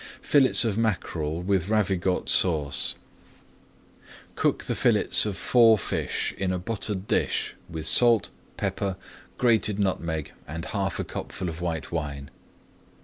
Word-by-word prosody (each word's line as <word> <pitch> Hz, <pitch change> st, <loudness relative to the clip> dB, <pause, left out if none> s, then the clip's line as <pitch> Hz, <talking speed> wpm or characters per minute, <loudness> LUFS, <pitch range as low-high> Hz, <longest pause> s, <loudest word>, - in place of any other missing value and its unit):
FILLETS 135 Hz, -4 st, +4 dB
OF 110 Hz, -1 st, -1 dB
MACKEREL 85 Hz, -7 st, -2 dB
WITH 95 Hz, -1 st, 0 dB
RAVIGOTE 95 Hz, -4 st, 0 dB
SAUCE 75 Hz, -6 st, +2 dB, 1.4 s
Cook -, -, 0 dB
the -, -, -2 dB
fillets -, -, +3 dB
of 100 Hz, -4 st, -4 dB
four 115 Hz, 0 st, +5 dB
fish 95 Hz, -, -2 dB
in 95 Hz, -1 st, 0 dB
a 90 Hz, -, -1 dB
buttered 100 Hz, 0 st, -3 dB
dish -, -, 0 dB, 0.2 s
with 80 Hz, -2 st, -6 dB
salt, 115 Hz, +6 st, +4 dB, 0.3 s
pepper, 95 Hz, -2 st, -2 dB, 0.4 s
grated 110 Hz, -4 st, +2 dB
nutmeg, 85 Hz, -6 st, -2 dB, 0.2 s
and 80 Hz, +3 st, -6 dB
half 95 Hz, -3 st, -3 dB
a -, -, -1 dB
cupful 90 Hz, -1 st, -6 dB
of 80 Hz, +1 st, -8 dB
white 80 Hz, -4 st, -4 dB
wine. 70 Hz, -4 st, -5 dB
95 Hz, 130 wpm, -25 LUFS, 80-105 Hz, 1.4 s, four